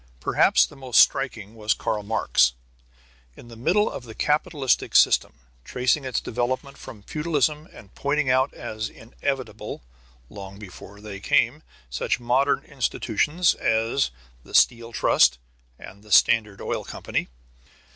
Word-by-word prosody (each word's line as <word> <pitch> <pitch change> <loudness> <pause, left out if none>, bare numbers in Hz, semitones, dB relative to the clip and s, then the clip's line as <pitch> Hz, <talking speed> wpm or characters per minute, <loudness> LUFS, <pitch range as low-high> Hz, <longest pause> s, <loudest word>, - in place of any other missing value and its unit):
Perhaps - - +3
the - - -14
most 130 -3 +1
striking 115 -6 +2
was 110 -1 -1
Karl 105 - -2
Marx, 105 - +2 0.8
in 120 - -14
the 115 - -11
middle 185 - +1
of - - -6
the 110 -2 -11
capitalistic 150 -2 0
system - - +4 0.3
tracing 130 - 0
its 130 - -1
development 130 +4 -3
from 115 -7 -12
feudalism 150 - -1
and 100 - -15
pointing 145 0 -1
out 130 +1 +2
as 110 +1 -6
inevitable, 115 - -5 0.4
long 100 +2 -10
before 100 0 -12
they 105 -2 -8
came, 120 +8 +1 0.3
such - - -1
modern 130 +4 +1
institutions 145 - 0
as 115 +4 0 0.3
the - - -8
Steel 115 0 +3
Trust 60 - +3 0.4
and 100 +2 -13
the 105 0 -17
Standard 105 -1 +4
Oil - - -3
Company. - - -4
120 Hz, 135 wpm, -24 LUFS, 110-140 Hz, 0.8 s, system